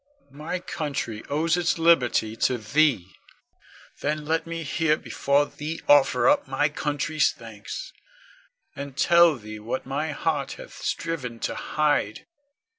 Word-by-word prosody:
My 150 +5 -4
country 140 -10 -4
owes 155 +3 +1
its 175 -1 +1
liberty 125 -9 +3
to 125 +2 +1
thee: 115 - +1 0.9
then 150 +1 -2
let 160 +1 -1
me 165 0 -4
here 155 +1 +1
before 140 -1 +1
thee 155 +3 -6
offer 145 -2 +5
up 290 0 +3
my 145 +1 +1
country's 150 +1 0
thanks, 115 - -9 0.8
and 140 -1 -7
tell 170 -1 +5
thee 110 -3 -9
what 115 +5 -4
my 145 +4 -2
heart 145 -2 -1
hath - - -11
striven 140 -8 -3
to - - -1
hide. 150 -8 0
145 Hz, 130 wpm, -25 LUFS, 130-160 Hz, 0.9 s, offer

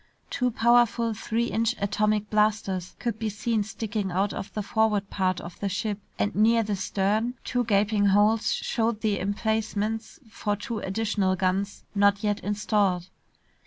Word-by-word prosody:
Two 250 -2 +1
powerful 235 -1 +3
three 225 +2 -1
inch 230 +1 +1
atomic 210 +1 +1
blasters 210 -4 0
could 230 -2 -3
be 220 - -1
seen 215 +2 -1
sticking 205 -1 -3
out 195 +3 0
of 195 - -6
the 210 - -1
forward 210 -1 +1
part 185 -2 0
of 170 0 -10
the 200 - -1
ship. 205 +1 -2 0.2
And 205 - 0
near 225 +2 +4
the 210 -1 -1
stern, 205 +5 0
two 245 0 0
gaping 205 -1 +2
holes 210 +3 +3
showed 225 -2 -1
the 215 -2 +1
emplacements 220 +2 -2
for 210 -1 -2
two 215 +2 -5
additional 200 -2 0
guns 190 +2 -1
not 200 0 +3
yet 210 0 +1
installed. 205 -4 0
210 Hz, 155 wpm, -26 LUFS, 200-220 Hz, 0.2 s, near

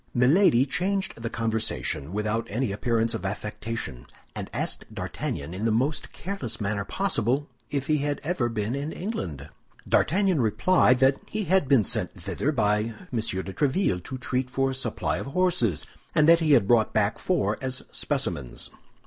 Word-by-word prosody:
Milady 130 +1 +5
changed 185 -1 -1
the 115 - -2
conversation 110 -10 -2
without 105 +3 -1
any 120 +1 -1
appearance 115 +2 +1
of - - -4
affectation, 105 - -4 0.3
and - - -6
asked - - -3
D'Artagnan 70 +4 -4
in 95 +4 -4
the 115 - +2
most 135 +8 0
careless 185 - -4
manner 100 0 -1
possible 145 - 0 0.2
if 140 -2 -2
he 155 +1 +2
had 145 0 -1
ever 150 -7 0
been 110 0 -2
in 140 +3 -3
England. 85 - -5 0.4
D'Artagnan 185 -3 +3
replied 125 - +4
that 135 +1 +4
he 215 0 -2
had 190 -5 +3
been 130 -5 +5
sent - - -1
thither 150 - -1
by 105 -6 +2 0.3
M. 120 - +1
de 95 -3 -3
Tréville 135 - +1
to 130 - -5
treat 125 0 -2
for 135 +1 +1
a - - -3
supply 130 - -1
of - - -5
horses, 140 - +1 0.3
and 155 0 +5
that 170 0 +7
he 155 -3 +3
had 115 -8 +5
brought 115 -1 +4
back 105 -1 +1
four 180 -2 0
as 130 -1 -3
specimens. 85 - -2
125 Hz, 165 wpm, -26 LUFS, 105-150 Hz, 0.4 s, that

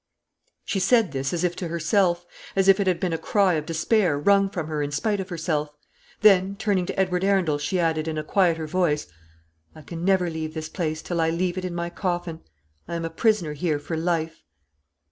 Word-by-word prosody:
She 195 - -1
said 225 - +3
this 135 0 -2
as 175 0 -2
if 175 -1 0
to 180 - -3
herself; 175 +2 +1 0.3
as 195 0 +2
if 195 +1 +6
it 200 - 0
had 180 -2 +2
been 180 -2 -1
a 165 - -2
cry 200 -3 +2
of 155 -1 -2
despair 170 0 +1
wrung 195 +6 +3
from 175 -5 -4
her 155 -1 -3
in 145 - -1
despite 205 +8 -1
of 190 0 -5
herself; 155 -3 -2 0.5
then, 195 -2 +5
turning 200 -4 0
to - - -4
Edward 180 -1 +1
Arundel, 185 -7 +2
she 165 +6 -1
added, 160 -2 0
in 160 -1 -3
a 155 - -2
quieter 165 -2 +1
voice, 155 -2 0 0.7
"I 155 - -12
can 165 +3 -7
never 185 -1 +3
leave 160 -1 -4
this 155 0 -5
place 155 -3 -3
till 170 -2 -1
I 160 - +2
leave 175 +2 -1
it 185 -1 -4
in 175 -1 -4
my 170 0 -3
coffin. 175 -3 -3 0.5
I 170 - -4
am 165 0 -3
a 165 - -4
prisoner 190 -4 +1
here 155 0 -1
for 155 +3 -5
life." 165 -1 -1
175 Hz, 215 wpm, -24 LUFS, 160-190 Hz, 0.7 s, if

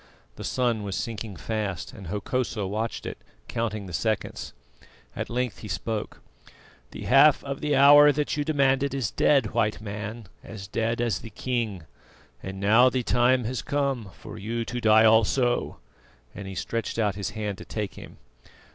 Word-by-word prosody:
The - - -8
sun 120 -4 0
was 100 -2 -4
sinking 110 -3 -4
fast, 100 - -4
and 100 -7 -10
Hokosa 105 +3 -2
watched 110 +4 -3
it, - - -6 0.3
counting 110 -3 -3
the 90 - -9
seconds. 110 +1 -2 0.6
At - - -4
length 120 -5 -2
he 110 - -8
spoke: 105 +4 -4 0.7
"The - - -8
half 140 +3 +5
of 140 -1 -5
the 150 -1 +1
hour 145 +2 +8
that 145 +1 -1
you 145 - 0
demanded 140 -2 +2
is 130 -7 -1
dead, 135 -7 +3
White 110 -2 0
Man, 105 +2 -6 0.2
as 100 -3 -8
dead 115 +4 -1
as 120 -2 0
the 115 - -9
king; 110 -5 -3 0.6
and 95 0 -6
now 110 +6 +5
the 130 -1 -1
time 125 +2 +3
has 120 +1 -3
come 135 -7 -1
for - - -10
you 115 +3 -3
to 120 +1 -4
die 110 0 +6
also," 115 +3 +3 0.6
and 100 -2 -8
he 95 - -7
stretched 115 +3 -3
out 105 -3 +1
his 100 -1 -4
hand 105 -3 -3
to - - -9
take 105 -3 -4
him. - - -12
115 Hz, 170 wpm, -26 LUFS, 105-125 Hz, 0.7 s, hour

